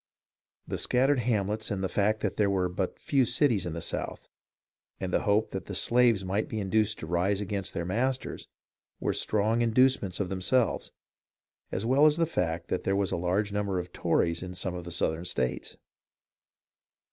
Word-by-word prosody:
The - - -3
scattered 130 +2 +2
hamlets 110 -2 -1
and 100 -3 -2
the - - +1
fact 105 +3 +1
that - - -1
there 105 -2 +3
were 95 -2 +1
but 90 +1 -3
few 135 -2 +2
cities 120 - +2
in 85 - -4
the 85 - -4
South, - - -4 0.7
and 90 -1 -4
the - - +2
hope 105 +2 +2
that 95 - -5
the 100 - -6
slaves 115 -2 +3
might 100 +4 -1
be 110 - -3
induced 105 +2 +1
to - - -6
rise 90 +4 0
against 100 -2 -3
their 85 - -2
masters, 125 +8 -2 0.5
were - - 0
strong 110 +2 +1
inducements 115 -5 +2
of 95 -3 -1
themselves, 95 +6 0 0.8
as 100 - -2
well 135 +5 +5
as 150 +1 +3
the 170 - +3
fact 85 - -2
that - - -1
there 95 - +1
was 100 -2 0
a - - 0
large 95 +4 0
number 100 -2 -1
of 90 0 -5
Tories 85 0 +1
in 90 0 -7
some 90 0 -1
of 90 -1 -6
the 85 - -7
Southern 80 -1 0
states. 65 -8 -2
100 Hz, 185 wpm, -28 LUFS, 90-115 Hz, 0.8 s, well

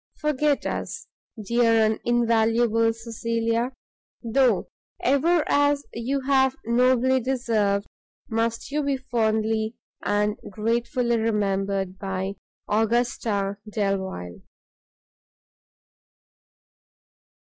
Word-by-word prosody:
forget 300 -1 +1
us, - - -4 0.4
dear 235 +1 +3
and 215 0 0
invaluable 230 -1 +2
Cecilia! 230 +1 -2 0.5
though, 235 -2 +2 0.3
ever, 305 +5 +3
as 285 0 +2
you 260 +4 -2
have 265 -1 +3
nobly 255 +2 +3
deserved, 225 -6 0 0.4
must 230 +2 -2
you 300 +1 0
be 280 -1 0
fondly 220 -3 0 0.3
and 210 0 +1
gratefully 235 +3 0
remembered 195 -3 -1
by 190 0 -3 0.3
AUGUSTA 220 -2 0
DELVILE. 190 - -3
230 Hz, 80 wpm, -25 LUFS, 210-255 Hz, 0.5 s, dear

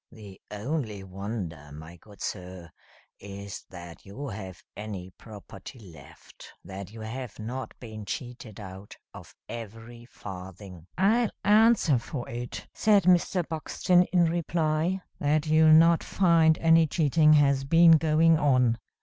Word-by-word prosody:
"The 100 -4 -13
only 105 -1 -4
wonder, 95 -6 -7
my 80 +3 -11
good 100 +4 -13
sir, 90 -3 -7 0.5
is 100 0 -9
that 85 -2 -11
you 130 +9 -8
have 95 -3 -9
any 100 -3 -7
property 105 +2 -12
left; 80 - -15
that 95 +2 -9
you 110 0 -11
have 115 +1 -7
not 125 +5 -7
been 110 -3 -9
cheated 120 -1 -7
out 95 0 -11 0.2
of - - -13
every 115 +1 -9
farthing." 95 -5 -11
"I'll 220 +5 +2
answer 210 - +4
for 120 +1 -7
it," 120 +1 -7
said 210 -3 +3
Mr. 180 0 +2
Buxton, 175 +3 +1
in 175 -2 +2
reply, 165 +1 -1 0.2
"that 150 +1 +1
you'll 155 0 +4
not 165 +1 +5
find 165 -4 +3
any 165 0 +4
cheating 155 0 +3
has 140 -2 +3
been 165 +4 +5
going 160 0 +4
on. 125 -5 +2
120 Hz, 130 wpm, -27 LUFS, 100-160 Hz, 0.5 s, not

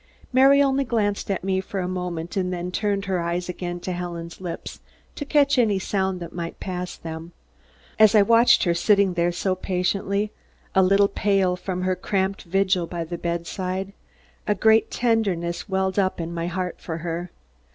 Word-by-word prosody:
Mary 275 +2 +6
only 275 0 +2
glanced 210 -6 -1
up 195 - +2
at - - -7
me 190 0 0
for 195 +1 -5
a 180 - -2
moment 180 -2 -4
and 185 -2 0
then 180 0 -4
turned 200 0 -1
her 190 -2 0
eyes 170 +1 -2
again 175 -1 -4
to 185 - -4
Helen's 170 -1 -6
lips 175 -2 -6 0.3
to 290 - -5
catch 285 -2 +3
any 215 -5 +3
sound 190 -1 -1
that 170 - -8
might 170 -1 -5
pass 180 -1 -4
them. 165 +1 -8 0.7
As 215 0 +7
I 210 - +7
watched 230 +3 +5
her 175 - +2
sitting 200 +2 +3
there 175 0 +1
so 185 +2 -1
patiently, 195 +3 -1 0.4
a 190 - +5
little 195 +2 +4
pale 195 -2 +1
from 180 0 -4
her 185 0 +1
cramped 195 +1 -1
vigil 185 -1 +1
by 170 -1 -4
the 170 +1 -6
bedside, 185 +3 -3 0.5
a 210 - +2
great 220 +3 +4
tenderness 200 -7 0
welled 190 0 0
up 190 -2 0
in 170 0 -4
my 170 0 -2
heart, 180 0 -4
for 160 -2 -4
her. 170 +1 -3
185 Hz, 185 wpm, -24 LUFS, 175-200 Hz, 0.7 s, As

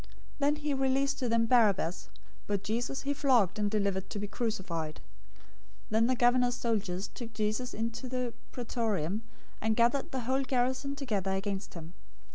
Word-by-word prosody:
027:026 - - -19 0.3
Then 290 +1 +3
he 300 -1 -2
released 270 +1 +1
to 250 - 0
them 230 0 +3
Barabbas, 210 -8 +3 0.4
but 200 -1 -1
Jesus 240 +6 -2
he 285 +1 0
flogged 250 - +3
and 205 -1 +2
delivered 200 -2 0
to - - -4
be 205 - -2
crucified. 185 -8 -2
027:027 - - -14 0.9
Then 225 +2 +4
the 255 - +3
governor's 245 0 +4
soldiers 200 -6 -1
took 230 -3 -8
Jesus 215 +4 -1
into 230 +3 -3
the 250 -2 -2 0.2
Praetorium, 220 -6 -1 0.4
and 220 0 +2
gathered 240 +4 +3
the 260 - -2
whole 260 +3 +1
garrison 260 +1 0
together 205 -9 -1
against 195 0 -3
him. 165 0 -8
230 Hz, 165 wpm, -31 LUFS, 205-255 Hz, 0.9 s, Then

